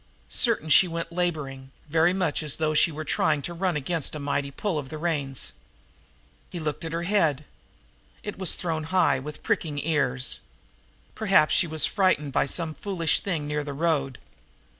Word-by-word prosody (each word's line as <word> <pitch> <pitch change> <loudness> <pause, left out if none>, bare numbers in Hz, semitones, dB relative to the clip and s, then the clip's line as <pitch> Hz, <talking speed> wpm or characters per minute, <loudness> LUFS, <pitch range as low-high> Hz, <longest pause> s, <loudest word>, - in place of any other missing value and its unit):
Certain 155 - +3
she 155 +4 +6
went 165 0 -4
laboring, 150 -7 -2 0.2
very 160 +3 +3
much 180 -5 0
as 150 -3 -2
though 155 -1 0
she 160 +2 +4
were 155 +1 -6
trying 150 -1 +1
to 175 - -3
run 180 0 -1
against 155 +2 -2
a - - -4
mighty 140 0 -1
pull 165 +4 -2
on 140 - -6
the 155 - -7
reins. 145 -5 -1 1.0
He 175 - -6
looked 155 -1 -3
at 165 - -4
her 165 +1 -2
head. 165 -7 +1 0.8
It 205 -2 -6
was 190 - +3
thrown 160 -3 -2
high, 160 -6 +2
with 150 +2 -8
pricking 150 -3 -1
ears. 140 -4 0 0.7
Perhaps 195 -8 +3
she 175 - +3
was 155 -1 +2
frightened 185 -8 +1
by - - +2
some 160 +1 -2
foolish 170 -3 0
thing 165 -7 -2
near 150 0 -2
the 145 -1 -5
road. 140 -4 0
155 Hz, 175 wpm, -26 LUFS, 145-175 Hz, 1.0 s, she